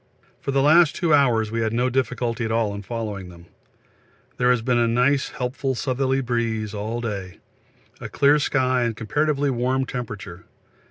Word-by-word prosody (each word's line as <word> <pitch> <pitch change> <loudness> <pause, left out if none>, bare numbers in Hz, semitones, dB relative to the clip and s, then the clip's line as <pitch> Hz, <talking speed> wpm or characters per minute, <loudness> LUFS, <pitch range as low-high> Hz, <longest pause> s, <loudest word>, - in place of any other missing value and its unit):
For - - -7
the 135 0 +2
last 155 +1 +5
two 170 -4 +1
hours 120 -7 +3
we 115 0 -1
had 110 0 -1
no 125 +2 +1
difficulty 125 -2 -1
at 110 - -2
all 110 -2 0
in 100 - -6
following 105 -3 -5
them. 85 -1 -14 0.9
There 125 0 +2
has 125 -2 +2
been 120 -1 +2
a 120 - +3
nice 125 +4 +2
helpful 130 +1 -3
southerly 130 +1 0
breeze 115 -4 -2
all 110 +3 -4
day, 100 -5 -5 0.6
a - - -7
clear 145 +2 +4
sky 130 -3 +1
and 115 -2 -1
comparatively 145 +5 0
warm 130 +2 0
temperature. 105 -9 -7
120 Hz, 170 wpm, -23 LUFS, 110-135 Hz, 0.9 s, last